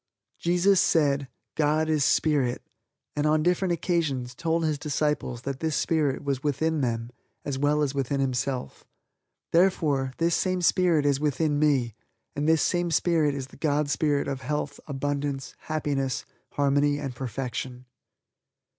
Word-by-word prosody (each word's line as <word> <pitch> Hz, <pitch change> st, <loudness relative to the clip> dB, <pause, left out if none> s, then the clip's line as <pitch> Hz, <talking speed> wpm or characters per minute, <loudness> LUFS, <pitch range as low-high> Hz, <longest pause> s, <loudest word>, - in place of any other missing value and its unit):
Jesus 180 Hz, +3 st, +3 dB
said, 140 Hz, -4 st, +2 dB, 0.3 s
"God 155 Hz, +1 st, +1 dB
is 155 Hz, -2 st, +2 dB
Spirit," 140 Hz, -6 st, +2 dB, 0.5 s
and 150 Hz, 0 st, +1 dB
on 155 Hz, 0 st, +3 dB
different 180 Hz, +1 st, +1 dB
occasions 160 Hz, -8 st, -1 dB
told 165 Hz, +5 st, -1 dB
His 155 Hz, -2 st, 0 dB
Disciples 150 Hz, -5 st, -1 dB
that 135 Hz, -1 st, -4 dB
this 160 Hz, -2 st, -1 dB
Spirit 150 Hz, -5 st, 0 dB
was 140 Hz, -2 st, -1 dB
within 155 Hz, +2 st, 0 dB
them 115 Hz, -1 st, -2 dB, 0.3 s
as 135 Hz, -2 st, -3 dB
well 150 Hz, +1 st, +2 dB
as 140 Hz, -2 st, -1 dB
within 140 Hz, 0 st, -1 dB
Himself. 130 Hz, -1 st, -2 dB, 0.7 s
Therefore, 155 Hz, -7 st, +2 dB
this 170 Hz, +1 st, +1 dB
same 185 Hz, 0 st, 0 dB
Spirit 170 Hz, -4 st, +3 dB
is 140 Hz, -1 st, +2 dB
within 150 Hz, 0 st, 0 dB
me 135 Hz, -6 st, +2 dB, 0.4 s
and 150 Hz, +2 st, 0 dB
this 160 Hz, -1 st, +4 dB
same 175 Hz, -1 st, +1 dB
Spirit 160 Hz, -3 st, +2 dB
is 135 Hz, -1 st, -5 dB
the -, -, -15 dB
God 150 Hz, -1 st, 0 dB
Spirit 145 Hz, -1 st, +1 dB
of 135 Hz, -2 st, -3 dB
health, 145 Hz, +2 st, -3 dB
abundance, 140 Hz, -1 st, -3 dB
happiness, 140 Hz, -5 st, -2 dB, 0.3 s
harmony 145 Hz, 0 st, +2 dB
and 140 Hz, -3 st, -4 dB
perfection. 125 Hz, 0 st, -5 dB
145 Hz, 145 wpm, -26 LUFS, 135-160 Hz, 0.7 s, this